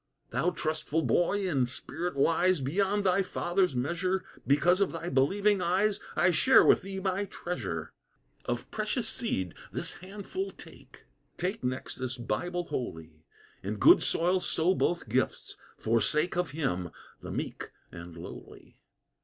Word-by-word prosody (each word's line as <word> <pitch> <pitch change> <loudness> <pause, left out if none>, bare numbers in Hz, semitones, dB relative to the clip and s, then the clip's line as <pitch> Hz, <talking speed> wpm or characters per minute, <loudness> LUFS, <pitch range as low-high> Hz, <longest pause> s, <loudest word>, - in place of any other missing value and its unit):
"Thou 180 - +1
trustful 155 -2 -1
boy, 195 +3 +2
in 135 -8 +1
spirit 160 +6 -3
wise 165 +5 +3
Beyond 195 +9 0
thy 190 0 +3
father's 180 -3 0
measure, 180 +8 -1 0.2
Because 170 +7 +4
of 200 - +2
thy 165 +1 -4
believing 195 +9 +2
eyes 195 +4 +2 0.2
I 185 - +4
share 260 +11 +6
with - - +5
thee 195 0 -5
my 190 +1 -1
treasure. 100 - -5 0.5
"Of - - -3
precious - - -1
seed 95 -2 -2 0.2
this - - -1
handful 205 - -5
take; - - -14 0.3
Take 190 +5 -2
next 130 +1 -3
this 130 0 -3
Bible 175 +10 -2
Holy: 80 - -6 0.3
In - - -3
good - - +7
soil 180 +3 +3
sow 180 0 +2
both 175 -5 0
gifts, 125 +4 -1 0.2
for 115 +1 +1
sake 150 - +1
Of 180 0 0
Him, 95 - -2 0.3
the - - -8
meek - - -4 0.2
and 85 0 -10
lowly. 85 - -11
175 Hz, 145 wpm, -29 LUFS, 130-185 Hz, 0.5 s, good